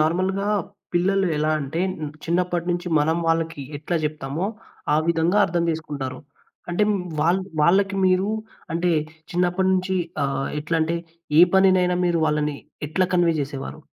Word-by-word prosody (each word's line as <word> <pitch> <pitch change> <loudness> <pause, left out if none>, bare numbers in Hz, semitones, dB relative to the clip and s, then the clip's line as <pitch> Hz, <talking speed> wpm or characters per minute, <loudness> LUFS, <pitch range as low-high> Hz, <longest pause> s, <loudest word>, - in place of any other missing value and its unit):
నార్మల్‌గా 185 +5 +1 0.5
పిల్లలు 190 +2 +2
ఎలా 155 +1 +1
అంటే, 145 +4 -3 0.4
చిన్నప్పటి 175 0 0
నుంచి 175 +1 -2
మనం 160 +2 +2
వాళ్ళకి 165 -2 0 0.2
ఎట్లా 160 +4 -2
జెప్తామో, 150 +3 -2 0.5
ఆ - - +4
విధంగా 170 +4 +2
అర్థం 170 -1 0
జేసుకుంటారు. 145 -5 -4 0.5
అంటే, 175 +4 +1 0.4
వాళ్ళ 170 +4 +3 0.2
వాళ్ళకి 195 +4 +3
మీరు 185 +2 +2 0.5
అంటే 175 +1 +1 0.4
చిన్నప్పటి 180 +2 +1
నుంచి 190 0 0 0.3
ఆహ్, 135 0 -1
ఎట్లా 160 +3 -1
అంటే, 165 +2 0 0.4
ఏ - - +10
పనినైనా 185 -2 +4
మీరు 175 -1 +2
వాళ్ళని 150 -1 0 0.3
ఎట్లా 180 +4 +1
కన్వే 175 -2 +3
జేసేవారు? 140 -1 -5
170 Hz, 135 wpm, -23 LUFS, 155-185 Hz, 0.5 s, ఏ